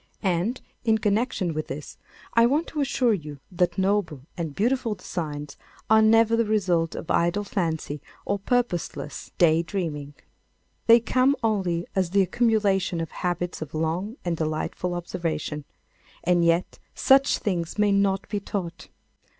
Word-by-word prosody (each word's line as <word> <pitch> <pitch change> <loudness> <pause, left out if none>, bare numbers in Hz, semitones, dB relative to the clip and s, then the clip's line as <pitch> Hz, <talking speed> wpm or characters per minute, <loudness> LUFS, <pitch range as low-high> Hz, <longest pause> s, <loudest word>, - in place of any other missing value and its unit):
And, 190 +6 0 0.2
in 220 -2 +3
connection 210 -4 0
with 155 0 -3
this, 140 +2 -7 0.3
I 230 0 +6
want 295 +6 +1
to 300 - -2
assure 255 -4 +2
you 150 -6 -5
that 175 -1 0
noble 190 -7 0
and 160 -5 -4
beautiful 235 0 +1
designs 150 -6 -5 0.3
are 220 0 +7
never 225 +1 +5
the 230 - +3
result 185 -7 +1
of - - -5
idle 175 +5 +2
fancy 160 -7 -2 0.2
or 200 0 -1
purposeless 195 - -2
day 165 -1 +5
dreaming. 155 -6 -4 0.7
They 230 0 +8
come 255 +4 +3
only 185 -6 0
as 185 -3 +1
the 195 +2 +4
accumulation 195 -4 +1
of 165 -1 -4
habits 175 -1 -3
of 155 0 -6
long 170 - -2
and 175 -1 0
delightful 160 +3 -2
observation. 165 -4 -3 0.6
And 175 0 +3
yet 170 +1 +1 0.2
such 270 +1 +4
things 175 -4 -2
may 210 -1 +3
not 195 -1 +1
be 210 - -2
taught. 190 -4 -5
185 Hz, 145 wpm, -25 LUFS, 165-215 Hz, 0.7 s, They